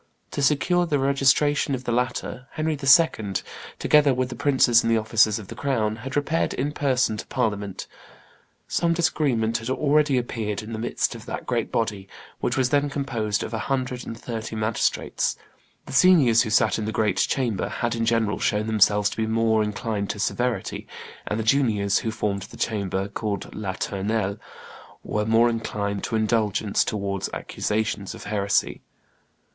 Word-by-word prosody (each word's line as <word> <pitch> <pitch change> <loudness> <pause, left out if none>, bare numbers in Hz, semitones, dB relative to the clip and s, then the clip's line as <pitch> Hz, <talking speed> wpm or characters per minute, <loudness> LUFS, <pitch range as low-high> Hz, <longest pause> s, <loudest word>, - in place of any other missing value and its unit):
To - - -3
secure 175 +5 +2
the 150 - +1
registration 140 +1 +2
of 130 - -7
the 120 - -2
latter, 125 +1 -2
Henry 155 0 -1
II., 135 - +4 0.4
together 145 -3 +4
with 125 0 -1
the 120 - -6
princes 130 -5 +4
and 115 - 0
the 115 - +4
officers 110 -1 +3
of 105 -4 -8
the - - -8
crown, 115 -4 -1
had 130 +3 -7
repaired 150 +3 0
in 140 +3 -1
person 130 -6 +1
to - - -7
Parliament; 105 -6 -2 0.8
some 170 0 +1
disagreement 140 -10 +1
had 115 +2 -6
already 145 0 +2
appeared 110 -4 -3
in 110 +2 -7
the 110 - -4
midst 120 - -1
of - - -11
that - - -5
great - - -1
body, 105 -4 -2 0.3
which - - -1
was 130 -1 +1
then 145 0 +2
composed 120 -8 -2
of 115 - -6
a 110 - -1
hundred 130 -2 -1
and 115 - -6
thirty 115 -2 -5
magistrates; 110 +1 -1 0.5
the - - -9
seniors 140 -9 +6
who 115 - -1
sat 110 - +3
in 110 - -3
the 110 - -2
great 105 -4 0
chamber 120 -4 0
had 120 -1 -2
in 115 -1 -1
general 115 -2 +1
shown 105 +1 0
themselves 105 -1 +3
to - - -8
be 110 -1 0
more 110 0 +2
inclined 105 -1 -2
to - - -3
severity, 120 +4 -2 0.4
and 105 - -1
the - - -1
juniors 110 -5 +2
who 115 - -3
formed 105 -3 -2
the - - -10
chamber 100 -3 -1
called 100 -1 -4
La 100 -2 -4
Tournelle 100 +1 -2 0.6
more 110 +2 +2
inclined 105 -3 -2
to - - -3
indulgence 110 -2 +1
towards 100 -2 -3
accusations 105 -2 -2
of - - -10
heresy. 100 -1 0
115 Hz, 170 wpm, -24 LUFS, 105-130 Hz, 0.8 s, seniors